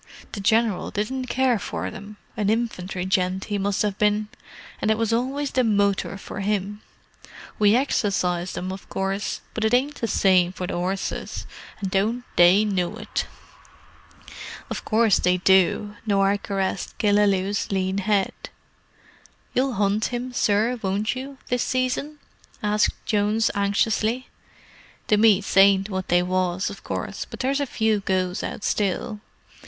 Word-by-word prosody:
"The 205 - -6
General 220 0 +1
didn't 255 +5 -3
care 255 -3 +2
for - - -4
them—an 210 0 -5
infantry 190 -5 -2
gent 185 0 0
he 205 -1 -2
must 200 +1 0
have 205 -2 -2
been—and 210 0 -2
it 220 - +3
was 225 0 0
always 270 +4 -1
the 255 - +2
motor 200 -3 +1
for 195 - -8
'im. 205 +1 -2 0.8
We 210 +1 +5
exercised 185 -9 0
'em, 185 +1 -3
of 190 - -9
course, 195 +1 -2
but 220 - -3
it 220 +2 +3
ain't 285 +4 -1
the 230 - 0
same 185 -3 +3
to 185 - -4
the - - -4
'orses, 185 +2 -3 0.3
and 195 -3 -3
don't 220 +6 0
they 180 +4 +6
know 185 -4 -1
it!" - - -3 1.4
"Of - - -4
course 220 -2 +3
they 180 0 +2
do." 190 +3 +3
Norah 200 0 +2
caressed 195 -2 -3
Killaloe's 205 -2 +2
lean 190 0 0
head. 200 -1 +1 1.2
"You'll 260 +1 +1
hunt 205 +1 +1
him, 245 +1 -4
sir, 225 +2 +1
won't 200 +4 -1
you, 270 +2 -7
this 245 -1 +1
season?" 255 +4 -1 0.5
asked 210 0 +2
Jones 210 +1 +1
anxiously. 220 +4 0 0.8
"The 210 - +5
meets 205 -3 +3
ain't 195 +1 +5
what 190 -1 -3
they 175 0 +3
was, 185 +1 0
of 200 - -11
course, - - -4
but - - -7
there's 270 +2 +1
a 285 - -1
few 220 -3 +1
goes 185 -2 -1
out - - -5
still. 210 +2 -1
205 Hz, 145 wpm, -24 LUFS, 190-225 Hz, 1.4 s, they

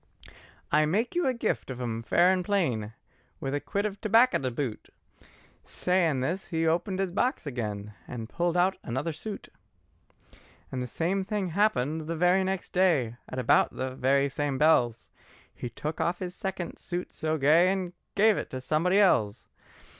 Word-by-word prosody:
"I 150 0 +4
make 220 +9 0
you 350 -4 +1
a 260 - +2
gift 235 - -2
on 130 -1 -5
'em 115 -2 -3
fair 170 +11 +4
and 185 -1 +1
plain, 130 - 0 0.5
With 135 - -3
a 145 - 0
quid 200 +8 -2
of 205 -1 -4
tobacco 230 +4 +4
to 130 - -1
boot." 125 -2 -4 0.7
Sayin' 170 -7 +1
this 175 +9 -2
he 165 -1 -1
opened 175 +4 0
his 190 -2 -1
box 245 - 0
again, 105 -6 -4
And 115 -3 -6
pulled 175 +6 -1
out 185 +2 +2
another 130 +7 -3
new - - -3
suit. 205 +7 -7 1.2
And 130 - -3
the 125 - -3
same 180 +9 -1
thing 200 -2 -2
happened 160 -6 +1
the 165 - -2
very 180 +3 +3
next 190 0 -3
day, 150 -11 +2
At 130 - -6
about 125 -3 +3
the 130 0 -3
very 135 +2 +2
same 140 0 -2
bells, 125 -6 +2 0.4
He 120 - -6
took 150 +7 -4
off 175 +1 0
his 180 -1 -5
second 190 -3 -5
suit 175 0 -5
so 155 0 -1
gay, 160 +6 +5
And 185 -2 -3 0.2
gave 215 +1 +4
it - - -4
to 130 - -5
somebody 160 +8 +1
else. 115 - +2
165 Hz, 175 wpm, -28 LUFS, 130-190 Hz, 1.2 s, gay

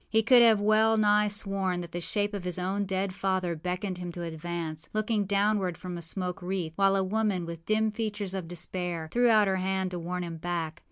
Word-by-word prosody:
He 220 0 +3
could 245 +2 +7
have 225 -3 +6
well 215 +2 +4
nigh 210 0 +4
sworn 195 -3 -1
that 170 -1 -8
the 175 - -4
shape 205 +3 -1
of 200 -3 -4
his 180 -1 -1
own 190 +3 -1
dead 190 0 -1
father 185 -3 -1
beckoned 180 +3 -3
him 175 -1 -5
to 175 - -5
advance, 165 -1 -4
looking 215 -1 0
downward 200 -3 +1
from 180 -1 -6
a 170 - -6
smoke 180 +3 -3
wreath, 180 -3 -3
while 195 +1 +3
a 195 - +2
woman, 200 -2 0
with 165 -1 -8
dim 215 0 +2
features 210 -3 -3
of 185 -3 -4
despair, 175 -1 -4
threw 245 0 +3
out 215 -2 +5
her 190 0 +1
hand 190 0 -1
to 180 - -4
warn 180 +1 -3
him 165 -1 -5
back. 165 -1 -3
190 Hz, 220 wpm, -28 LUFS, 175-205 Hz, -, could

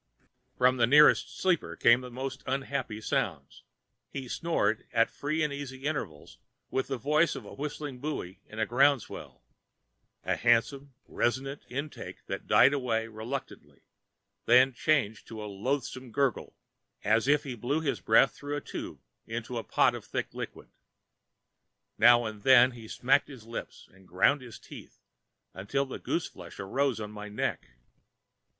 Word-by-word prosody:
From 130 +1 +4
the 115 -1 +4
nearest 150 +4 +5
sleeper 185 -4 +1
came 120 +2 +5
the 125 - -8
most 130 +2 -5
unhappy 130 -4 -3
sounds. - - -2 0.5
He 135 -2 -6
snored 115 -8 -1
at 115 0 +2
free 155 +2 -1
and 150 -2 -1
easy 135 -2 -7
intervals 80 - -4 0.3
with 130 - -1
the 135 - -2
voice 150 +7 +2
of - - -8
a - - -10
whistling 145 -2 -5
buoy 125 -10 -5
in 105 - -12
a 110 - +1
ground 135 +3 +3
swell—a - - -9
handsome, 135 +3 +1
resonant 135 +4 -2
intake 140 +4 -6
that - - -6
died - - +6
away 115 -5 -1
reluctantly, 115 +5 -7 0.6
then 130 +2 +6
changed 120 -6 0
to 110 -2 -7
a - - -5
loathsome 125 +4 -3
gurgle, 135 -1 -1 0.5
as 115 +4 +2
if 145 +1 +4
he 135 - -5
blew 125 +6 -1
his 155 - -1
breath 135 - +4
through 145 0 -5
a - - -1
tube - - -7 0.3
into 120 +1 -4
a - - -6
pot - - +3
of - - -7
thick - - -4
liquid. - - -7 1.3
Now 120 +1 +7
and 110 -1 -6
then 130 +1 +7
he 115 -2 -11
smacked 125 +4 +2
his 130 -6 -12
lips 115 +1 -8
and 95 -1 -20
ground 95 +11 +3
his 120 -3 -10
teeth - - -13 0.6
until 120 +9 -1
the 130 - -7
gooseflesh - - -4
arose 130 +5 0
on 105 -1 -6
my 105 0 -8
neck. 105 - -2
130 Hz, 155 wpm, -29 LUFS, 115-140 Hz, 1.3 s, Now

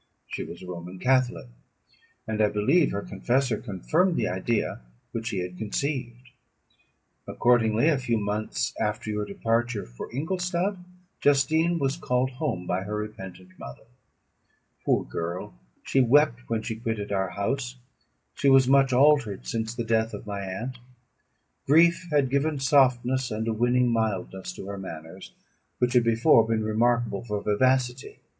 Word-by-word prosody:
She - - -5
was 85 - -9
a - - -8
Roman 90 +1 -7
catholic; 125 - +1 0.8
and 110 -1 -1
I 105 - +4
believe 120 +12 +3
her 100 0 -3
confessor 120 +4 0
confirmed 165 - 0
the - - 0
idea 95 - -1 0.3
which 115 -1 -4
she 100 -6 -2
had 90 0 -6
conceived. 125 +2 -3 1.0
Accordingly, 115 +1 +3
a 155 -5 +3
few 120 -3 0
months 105 +2 -2
after 105 0 -2
your 105 0 -2
departure 115 +2 -1
for - - -9
Ingolstadt, 180 - -1 0.4
Justine 160 +4 +3
was 140 -1 -1
called 125 -4 0
home 125 - -3
by 90 +1 -1
her 105 +2 -4
repentant 95 -4 -7
mother. 65 - -10 1.0
Poor - - +2
girl! 85 -2 -5 0.3
she 135 - +2
wept 125 -1 +3
when 115 -1 -1
she 110 0 -4
quitted 110 -3 -4
our 95 -2 0
house; 125 +6 -2 0.6
she 140 - +2
was 135 -1 +6
much 135 0 +4
altered 130 - +3
since 110 - -3
the 120 - -2
death 115 0 0
of - - -9
my 100 -1 -4
aunt; 115 +7 -5 0.9
grief 170 +4 +4
had 145 -4 +2
given 145 +2 +1
softness 130 -2 +3
and 110 0 -3
a 115 - +1
winning 120 +2 +2
mildness 105 - -2
to 95 - -9
her 100 0 -6
manners, 80 0 -9 0.4
which 125 0 +1
had 125 -2 +5
before 115 +1 +4
been 110 -1 0
remarkable 115 0 +1
for 105 -3 -3
vivacity. 125 +4 0
115 Hz, 150 wpm, -26 LUFS, 105-130 Hz, 1.0 s, was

